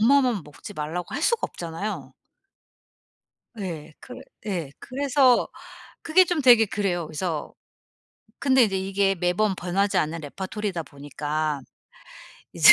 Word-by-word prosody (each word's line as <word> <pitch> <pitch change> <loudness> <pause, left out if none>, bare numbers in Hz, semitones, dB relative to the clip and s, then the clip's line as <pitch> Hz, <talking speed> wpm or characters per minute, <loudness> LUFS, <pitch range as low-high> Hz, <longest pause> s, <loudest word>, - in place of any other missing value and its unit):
엄마만 245 - +4
먹지 150 +7 -11
말라고 160 +4 -4
할 - - -2
수가 470 -2 +3
없잖아요. 170 +5 -5 1.5
예. 165 -6 -5
그 250 - -10 0.3
예 170 -8 -2
그래서 265 -1 +3 0.5
그게 365 +3 +5
좀 345 -3 0
되게 240 -4 +7
그래요. 185 -5 -1
그래서 160 0 -3 0.9
근데 265 -3 +5
이제 195 -3 -1
이게 195 +1 +1
매번 180 +3 +1
변하지 195 +3 0
않는 160 +2 -1
레파토리다 190 +4 -4
보니까 145 +1 -3 0.9
이제 - - +9
190 Hz, 260 characters per minute, -25 LUFS, 160-235 Hz, 1.5 s, 이제